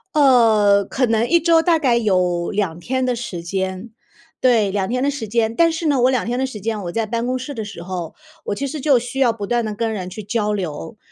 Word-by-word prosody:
呃， 225 Hz, -8 st, +5 dB
可 260 Hz, -, 0 dB
能 225 Hz, -1 st, +1 dB
1 340 Hz, +4 st, +4 dB
周 330 Hz, 0 st, +4 dB
大 330 Hz, -1 st, +2 dB
概 250 Hz, -5 st, +2 dB
有 180 Hz, -6 st, +1 dB
2 195 Hz, -5 st, -1 dB
天 260 Hz, +6 st, -1 dB
的 250 Hz, -1 st, 0 dB
时 230 Hz, -7 st, -6 dB
间 190 Hz, +4 st, -4 dB, 0.5 s
对， 225 Hz, -6 st, +3 dB
2 195 Hz, -1 st, -1 dB
天 250 Hz, +2 st, -1 dB
的 285 Hz, -, +2 dB
时 245 Hz, -6 st, -5 dB
间。 225 Hz, +1 st, 0 dB
但 335 Hz, -1 st, +4 dB
是 325 Hz, +1 st, -4 dB
呢， 285 Hz, -5 st, +2 dB
我 255 Hz, -, +5 dB
2 255 Hz, -, 0 dB
天 245 Hz, +2 st, -2 dB
的 265 Hz, -, 0 dB
时 220 Hz, -5 st, -8 dB
间， 215 Hz, 0 st, -3 dB
我 175 Hz, -, -4 dB
在 225 Hz, +3 st, -1 dB
办 230 Hz, +2 st, -2 dB
公 255 Hz, 0 st, -1 dB
室 270 Hz, +3 st, -6 dB
的 225 Hz, -, -5 dB
时 205 Hz, -4 st, -9 dB
候， 180 Hz, -3 st, -6 dB, 0.3 s
我 205 Hz, -, -3 dB
其 280 Hz, -, -3 dB
实 290 Hz, +1 st, -5 dB
就 280 Hz, -3 st, +4 dB
需 250 Hz, +3 st, -6 dB
要 250 Hz, -4 st, +4 dB
不 210 Hz, -3 st, -6 dB
断 240 Hz, +3 st, 0 dB
地 215 Hz, -1 st, -3 dB
跟 225 Hz, +1 st, -2 dB
人 185 Hz, -3 st, -5 dB
去 215 Hz, +3 st, -8 dB
交 210 Hz, 0 st, -1 dB
流， 175 Hz, -, -5 dB
230 Hz, 250 characters per minute, -20 LUFS, 200-255 Hz, 0.5 s, 呃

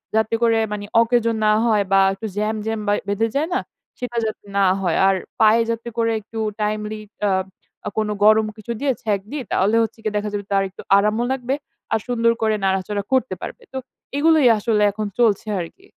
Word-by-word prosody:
যাতে 220 Hz, +1 st, +2 dB
করে 230 Hz, -1 st, +4 dB
মানে 205 Hz, -1 st, -4 dB, 0.2 s
অকেজো 230 Hz, 0 st, +2 dB
না 215 Hz, -, +5 dB
হয়, 215 Hz, -3 st, +3 dB
বা 195 Hz, -, +6 dB
একটু 195 Hz, +3 st, -6 dB
জ্যাম, 215 Hz, +1 st, 0 dB
জ্যাম 220 Hz, 0 st, -2 dB
বা 205 Hz, -, +3 dB
বেঁধে 205 Hz, +3 st, +1 dB
যায় 310 Hz, +5 st, 0 dB
না? -, -, +2 dB, 0.4 s
সেটা 245 Hz, -1 st, -4 dB
যাতে 215 Hz, -1 st, -5 dB
না 200 Hz, -, +4 dB, 0.2 s
হয়। 175 Hz, -3 st, +1 dB
আর 195 Hz, -, +4 dB, 0.3 s
পায়ে 220 Hz, +2 st, +6 dB
যাতে 230 Hz, +1 st, -3 dB
করে 230 Hz, 0 st, +2 dB
একটু 225 Hz, +2 st, -8 dB, 0.2 s
টাইমলি 210 Hz, 0 st, -2 dB, 0.2 s
অ্যা 200 Hz, -, +3 dB, 0.5 s
আ -, -, 0 dB
কোনো 215 Hz, -1 st, 0 dB
গরম 215 Hz, +1 st, +6 dB
কিছু 215 Hz, +2 st, -7 dB
দিয়ে 280 Hz, -1 st, +1 dB
ছ্যাঁক 205 Hz, -3 st, 0 dB
দি, 300 Hz, -, -3 dB
তাহলে 200 Hz, +4 st, +2 dB
হচ্ছে 225 Hz, 0 st, -5 dB
গিয়ে 215 Hz, -1 st, -2 dB
দেখা 210 Hz, 0 st, -2 dB
যাবে 205 Hz, -1 st, -3 dB
তার 195 Hz, 0 st, +3 dB
একটু 190 Hz, -, -11 dB, 0.2 s
আরামও 210 Hz, +3 st, +2 dB
লাগবে। 265 Hz, +1 st, -1 dB, 0.4 s
আর 220 Hz, -, +3 dB
সুন্দর 230 Hz, -1 st, +2 dB
করে 220 Hz, -1 st, +2 dB
নাড়াচড়া 195 Hz, +1 st, 0 dB
করতে 260 Hz, 0 st, +2 dB
পারবে। -, -, -7 dB
তো -, -, -3 dB, 0.4 s
এগুলোই 315 Hz, -2 st, +5 dB
আসলে 210 Hz, 0 st, +1 dB
এখন 215 Hz, +1 st, -4 dB
চলছে 220 Hz, -3 st, +2 dB
আরকি। 180 Hz, -, -8 dB
220 Hz, 200 wpm, -21 LUFS, 205-230 Hz, 0.5 s, বা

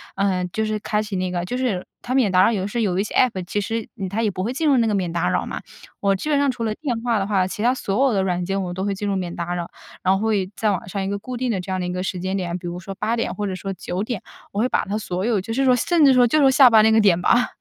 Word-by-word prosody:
呃， 190 Hz, -2 st, 0 dB
就 220 Hz, +5 st, -2 dB
是 215 Hz, 0 st, -1 dB
开 210 Hz, +1 st, -1 dB
启 210 Hz, -2 st, -5 dB
那 185 Hz, 0 st, -1 dB
个 175 Hz, 0 st, -2 dB
就 250 Hz, +6 st, -3 dB
是 230 Hz, -9 st, -1 dB
它 255 Hz, -, -4 dB
免 245 Hz, -8 st, +3 dB
打 185 Hz, 0 st, +5 dB
扰 225 Hz, -, +4 dB
有 200 Hz, -4 st, -1 dB
的 -, -, -2 dB
时 235 Hz, -, -5 dB
候 -, -, +2 dB
有 190 Hz, -3 st, 0 dB
一 -, -, +2 dB
些 -, -, -7 dB
App 235 Hz, -7 st, +3 dB
其 205 Hz, +3 st, -2 dB
实， 225 Hz, +2 st, -3 dB
嗯， 190 Hz, -2 st, -4 dB
它 220 Hz, +4 st, -1 dB
也 215 Hz, -, +2 dB
不 185 Hz, -1 st, -4 dB
会 235 Hz, -, -1 dB
进 305 Hz, +4 st, -1 dB
入 280 Hz, -, +5 dB
那 230 Hz, -1 st, +3 dB
个 210 Hz, -, 0 dB
免 180 Hz, -4 st, -1 dB
打 170 Hz, -, 0 dB
扰 -, -, 0 dB
嘛。 -, -, -5 dB, 0.4 s
我 200 Hz, -1 st, +2 dB
基 305 Hz, +11 st, -4 dB
本 290 Hz, -, +3 dB
上 280 Hz, -2 st, +2 dB
除 235 Hz, -2 st, -5 dB
了 215 Hz, -, 0 dB
电 245 Hz, -5 st, -3 dB
话 235 Hz, -3 st, +1 dB
的 195 Hz, -, 0 dB
话， 195 Hz, -3 st, +1 dB
其 210 Hz, +3 st, -5 dB
它 250 Hz, +2 st, +4 dB
所 260 Hz, +2 st, +1 dB
有 240 Hz, -, +1 dB
的 190 Hz, -1 st, +1 dB
软 180 Hz, -1 st, -1 dB
件 195 Hz, +2 st, -1 dB
我 175 Hz, -1 st, -4 dB
都 190 Hz, +1 st, -3 dB
会 200 Hz, -1 st, 0 dB
进 205 Hz, +1 st, -4 dB
入 200 Hz, -, 0 dB
免 180 Hz, -2 st, -3 dB
打 175 Hz, +1 st, -3 dB
扰。 170 Hz, -1 st, -4 dB, 0.3 s
然 190 Hz, +1 st, +3 dB
后 220 Hz, +1 st, +1 dB
也 190 Hz, -2 st, 0 dB
在 215 Hz, -2 st, +2 dB
晚 185 Hz, -1 st, -4 dB
上 200 Hz, 0 st, -3 dB
一 -, -, -2 dB
个 200 Hz, 0 st, -2 dB
固 250 Hz, +4 st, -6 dB
定 255 Hz, 0 st, -1 dB
的 195 Hz, -5 st, -1 dB
这 190 Hz, -, -7 dB
样 185 Hz, -, -1 dB
的 180 Hz, -, -2 dB
一 180 Hz, -, -3 dB
个 180 Hz, -, -3 dB
时 185 Hz, -1 st, -3 dB
间 190 Hz, +2 st, -2 dB
点， 180 Hz, -2 st, -2 dB
比 175 Hz, -1 st, -7 dB
如 175 Hz, +1 st, -5 dB
说 195 Hz, +2 st, -7 dB
8:00 225 Hz, +3 st, -1 dB
或 205 Hz, -1 st, -3 dB
者 190 Hz, -, -3 dB
说 195 Hz, +2 st, -5 dB
9:00， 195 Hz, +5 st, -4 dB, 0.3 s
我 200 Hz, -, -3 dB
会 245 Hz, -, +3 dB
把 -, -, 0 dB
它 205 Hz, +1 st, -3 dB
所 185 Hz, -3 st, -3 dB
有 225 Hz, -4 st, +2 dB
就 225 Hz, +5 st, -5 dB
是 270 Hz, +3 st, +1 dB
说 255 Hz, -1 st, +5 dB
甚 335 Hz, +6 st, +2 dB
至 275 Hz, -2 st, +7 dB
说 245 Hz, -1 st, +5 dB
就 305 Hz, +6 st, +2 dB
是 -, -, +4 dB
说 265 Hz, -, +6 dB
下 260 Hz, -1 st, +7 dB
班 220 Hz, -2 st, +6 dB
那 220 Hz, -, +5 dB
个 220 Hz, -, +5 dB
点 185 Hz, -4 st, +4 dB
吧。 245 Hz, +6 st, +3 dB
200 Hz, 370 characters per minute, -22 LUFS, 185-230 Hz, 0.4 s, 至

